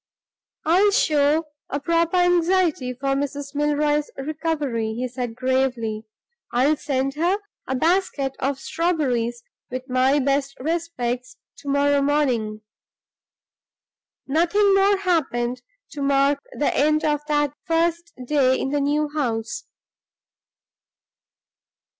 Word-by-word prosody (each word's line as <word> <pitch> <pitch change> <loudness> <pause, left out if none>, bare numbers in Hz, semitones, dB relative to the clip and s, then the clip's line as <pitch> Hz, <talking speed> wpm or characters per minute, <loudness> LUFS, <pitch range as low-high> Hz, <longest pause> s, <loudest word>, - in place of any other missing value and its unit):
"I'll 365 +6 +5
show 305 -6 +2 0.2
a 285 - -2
proper 335 +3 +1
anxiety 355 -6 +2
for 270 +2 -4
Mrs. 280 +1 -2
Milroy's 295 0 +1
recovery," 280 -6 -2
he 250 +2 -2
said, 245 -2 -5
gravely. 250 -4 -1 0.5
"I'll 265 +6 +3
send 275 -2 -1
her 345 +6 +1 0.3
a 265 - -1
basket 315 -3 +1
of 275 +1 -1
strawberries, 260 -8 -1 0.3
with 255 +1 -5
my 260 +2 +3
best 275 0 0
respects, 255 -6 -3 0.2
to 285 - -8
morrow 285 0 +3
morning." 250 -7 0 1.6
Nothing 350 +8 +3
more 390 +1 +4
happened 270 -10 0 0.3
to 290 - -6
mark 275 0 +3
the 290 - -1
end 305 +2 +2
of 295 -1 +2
that 295 -2 +1
first 340 +1 0
day 260 -2 +3
in - - -2
the 290 0 +1
new 295 +2 +1
house. 250 -2 -3
285 Hz, 110 wpm, -23 LUFS, 260-320 Hz, 1.6 s, I'll